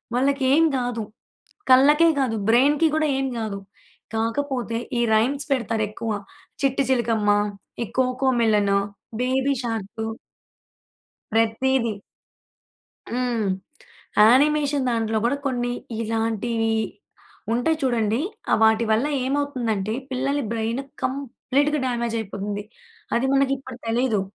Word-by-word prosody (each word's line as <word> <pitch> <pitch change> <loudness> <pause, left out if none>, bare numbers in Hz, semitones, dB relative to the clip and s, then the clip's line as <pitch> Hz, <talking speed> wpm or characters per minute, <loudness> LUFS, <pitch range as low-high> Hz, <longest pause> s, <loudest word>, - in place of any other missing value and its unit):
వాళ్ళకి 275 +2 +1
ఏం 320 +3 +5
గాదు. 245 -3 -2 0.7
కళ్ళకే 295 +6 +6
గాదు 245 -4 0
బ్రైన్‌కి 285 +7 +4
కూడా 315 0 +2
ఏం 270 - 0
గాదు. 215 -3 -3 0.6
కాకపోతే 235 +1 -1 0.2
ఈ - - +2
రైమ్స్ 265 +6 +2
పెడతారు 230 -4 0
ఎక్కువ 225 +1 -5 0.5
చిట్టి 275 0 +2
చిలుకమ్మ, 230 -4 +2 0.5
ఈ - - 0
కోకో 260 +1 +1
మెలను, 205 -3 +3 0.4
బేబీ 260 +2 +1
షార్కు 225 -2 -4 1.3
ప్రతీది. 230 +2 +2 1.2
హ్మ్. 240 -3 -1 0.8
యానిమేషన్ 285 +2 +3
దాంట్లో 225 -2 0
కూడా 280 +4 +1
కొన్ని 245 -2 -1 0.3
ఇలాంటివి 225 0 -1 0.8
ఉంటాయి 280 +7 +1
చూడండి. 230 -3 +1 0.3
ఆ! - - +5
వాటి 220 +1 +4
వల్ల 220 +5 +2 0.2
ఏమవుతుందంటే 250 -7 -1 0.2
పిల్లల 270 +3 0
బ్రైన్ 230 +2 -1 0.2
కంప్లీట్‌గా 280 +2 0
డామేజయిపోతుంది. 220 -4 -3 0.5
అది 240 - +1
మనకి 275 0 +3
ఇప్పుడు 260 -2 -10
తెలియదు. 225 -2 +1
245 Hz, 105 wpm, -23 LUFS, 225-270 Hz, 1.3 s, కళ్ళకే